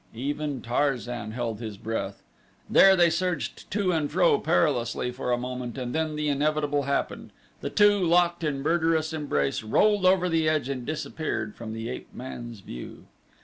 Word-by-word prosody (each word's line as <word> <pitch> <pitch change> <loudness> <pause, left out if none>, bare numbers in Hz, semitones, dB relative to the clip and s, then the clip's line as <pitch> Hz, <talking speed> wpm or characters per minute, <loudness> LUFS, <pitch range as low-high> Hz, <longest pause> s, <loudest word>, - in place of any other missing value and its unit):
Even 145 +2 -3
Tarzan 120 -3 -1
held 115 -1 -3
his 110 -3 -6
breath. 100 -2 -4 0.4
There 195 0 +7
they 175 -2 +4
surged 180 +1 -2
to 200 -2 +1
and 155 -4 0
fro 170 -3 +4
perilously 130 -7 +1
for 125 0 -3
a 120 - +3
moment 125 0 -5
and 125 -2 -4
then 160 -1 -1
the 150 0 -1
inevitable 145 0 +1
happened 140 - -2 0.3
the - - -4
two, 205 -1 +4
locked 175 0 +3
in 140 -3 -1
murderous 160 0 +1
embrace, 75 - -1
rolled 195 - +3
over 185 -1 +4
the 165 -2 +2
edge 150 -4 0
and 125 -3 -4
disappeared 150 -8 -3
from 110 -2 -7
the 115 0 -5
ape 125 - -7
man's 120 -4 -7
view. - - -9
145 Hz, 165 wpm, -26 LUFS, 120-165 Hz, 0.4 s, There